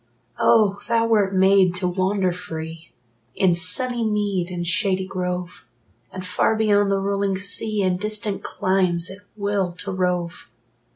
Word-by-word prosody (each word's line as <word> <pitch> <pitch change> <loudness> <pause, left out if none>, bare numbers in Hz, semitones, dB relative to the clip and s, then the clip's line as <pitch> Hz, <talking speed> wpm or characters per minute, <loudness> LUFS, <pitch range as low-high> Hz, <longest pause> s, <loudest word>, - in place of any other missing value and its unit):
Oh, 210 -3 +4
thou 230 -1 +2
wert 205 -4 +2
made 190 -1 +4
to 180 0 -1
wander 185 +1 0
free 160 -2 -7 0.4
In 185 -2 +3
sunny 240 +8 +1
mead 205 -4 -1
and 175 -1 -4
shady 190 +1 0
grove, 180 -5 -4 0.5
And 185 0 -7
far 185 +4 +1
beyond 205 -2 +3
the 195 - +2
rolling 195 0 -1
sea, 200 +1 -1
In 185 -1 +1
distant 210 0 -2
climes, 185 -2 0
at 190 - -10 0.2
will 200 -3 -1
to 195 +3 -6
rove! 180 -2 -2
190 Hz, 140 wpm, -22 LUFS, 180-205 Hz, 0.5 s, Oh